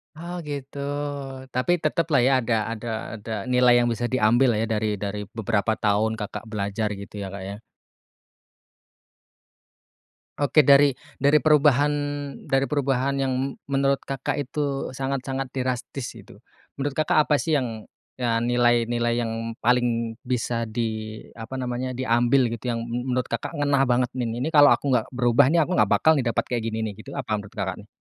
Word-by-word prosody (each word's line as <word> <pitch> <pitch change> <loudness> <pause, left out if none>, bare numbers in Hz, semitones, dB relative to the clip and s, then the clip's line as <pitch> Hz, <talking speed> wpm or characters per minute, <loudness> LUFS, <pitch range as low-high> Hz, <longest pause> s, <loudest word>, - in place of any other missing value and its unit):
Oh, 170 +3 -7
gitu. 140 0 -6 0.7
Tapi 125 +7 +1
teteplah 155 -2 +2
ya, 130 - +4
ada 115 -1 0 0.2
ada 115 +1 -6 0.3
ada 110 +2 -8 0.2
nilai 125 -1 +5
yang 120 - +1
bisa 115 +1 -2
diambillah 120 +1 +4
ya 115 - -1
dari 105 0 0
dari 100 +1 -4 0.2
beberapa 110 0 +1
tahun 110 0 +1
Kakak 105 +1 -6
belajar 105 +1 -2
gitu 100 +1 -10
ya, 100 - -4
Kak, 100 -1 -6
ya? 100 +1 -6 2.8
Oke, 145 +2 +4
dari 140 0 +6 0.2
dari 145 +2 +4
perubahan 145 -1 +4 0.6
dari 135 0 +1
perubahan 140 -1 0
yang 135 -1 0
m 130 +1 0 0.2
menurut 140 0 +1
Kakak 135 +1 -3
itu 140 -1 -3
sangat-sangat 135 0 -3
drastis 130 0 -4
gitu, 100 -3 -14 0.4
menurut 140 0 -2
Kakak 155 0 +2
apa 150 -2 +2
sih 160 -2 +1
yang 115 -5 -5 0.3
ya 115 -2 +1
nilai 120 0 +2
nilai 120 0 0
yang 115 0 -4
paling 120 -1 +1
bisa 120 -3 -2
di 110 -1 -4
apa 115 +3 -7
namanya, 125 0 -3
diambil 120 0 +2
gitu 120 +2 -4
yang 115 -1 -2
m 125 +2 -4
menurut 125 -1 0
Kakak 115 - -3
ngena 145 -1 +2
banget 125 0 +1
nih, 125 -3 -2 0.2
"Ini 160 - 0
kalau 145 -1 +8
aku 140 -2 +2
nggak 120 -2 +1
berubah 125 +2 +3
nih 170 - +2
aku 180 - -3
nggak - - +3
bakal 160 - +4
nih 140 -5 0
dapat 115 - 0
kayak 120 -2 -2
gini 110 0 -2
nih," 105 - -4
gitu. 140 +5 -9
Apa 125 -5 -3
menurut, 105 +2 -5
Kakak 95 -2 -2
nih? 105 - -18
125 Hz, 170 wpm, -24 LUFS, 115-135 Hz, 2.8 s, kalau